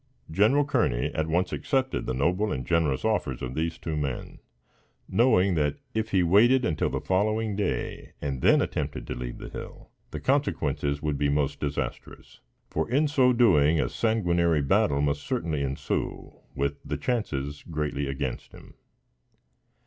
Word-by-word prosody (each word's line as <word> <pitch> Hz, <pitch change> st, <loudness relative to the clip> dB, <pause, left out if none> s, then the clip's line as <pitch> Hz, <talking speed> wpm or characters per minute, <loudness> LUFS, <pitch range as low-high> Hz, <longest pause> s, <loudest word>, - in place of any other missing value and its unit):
General 110 Hz, -, +4 dB
Kearney -, -, 0 dB
at 80 Hz, 0 st, -1 dB
once 90 Hz, +3 st, 0 dB
accepted 130 Hz, -2 st, -1 dB
the 65 Hz, -, -1 dB
noble 90 Hz, +10 st, +1 dB
and 65 Hz, -2 st, -3 dB
generous 80 Hz, -, +1 dB
offers 85 Hz, -, -1 dB
of 65 Hz, 0 st, -4 dB
these 80 Hz, +3 st, -2 dB
two 80 Hz, -2 st, -4 dB
men, 70 Hz, -4 st, -4 dB, 0.7 s
knowing 100 Hz, -6 st, +3 dB
that 75 Hz, -3 st, +1 dB, 0.2 s
if 110 Hz, 0 st, -1 dB
he 95 Hz, -3 st, +3 dB
waited 120 Hz, +9 st, +5 dB
until 80 Hz, -, 0 dB
the -, -, -2 dB
following 105 Hz, +2 st, 0 dB
day 100 Hz, 0 st, -3 dB
and 70 Hz, -3 st, -3 dB
then -, -, +5 dB
attempted -, -, -3 dB
to -, -, -4 dB
leave -, -, -6 dB
the -, -, -8 dB
hill, -, -, -9 dB, 0.2 s
the -, -, -5 dB
consequences 75 Hz, -, 0 dB
would 75 Hz, -2 st, -1 dB
be 70 Hz, -, +2 dB
most 70 Hz, -1 st, 0 dB
disastrous; 70 Hz, -3 st, -5 dB, 0.3 s
for, 80 Hz, -, -2 dB
in 145 Hz, +5 st, +3 dB
so 130 Hz, -3 st, +4 dB
doing, 85 Hz, -11 st, +4 dB
a -, -, +1 dB
sanguinary 85 Hz, -8 st, +1 dB
battle 70 Hz, +1 st, +2 dB
must 70 Hz, 0 st, 0 dB
certainly 85 Hz, -, -2 dB
ensue, 70 Hz, -1 st, -3 dB, 0.2 s
with 70 Hz, +1 st, -2 dB
the -, -, -3 dB
chances 75 Hz, -, -2 dB
greatly 75 Hz, -3 st, -2 dB
against 70 Hz, -2 st, -4 dB
him. -, -, -14 dB
80 Hz, 155 wpm, -27 LUFS, 70-110 Hz, 0.7 s, waited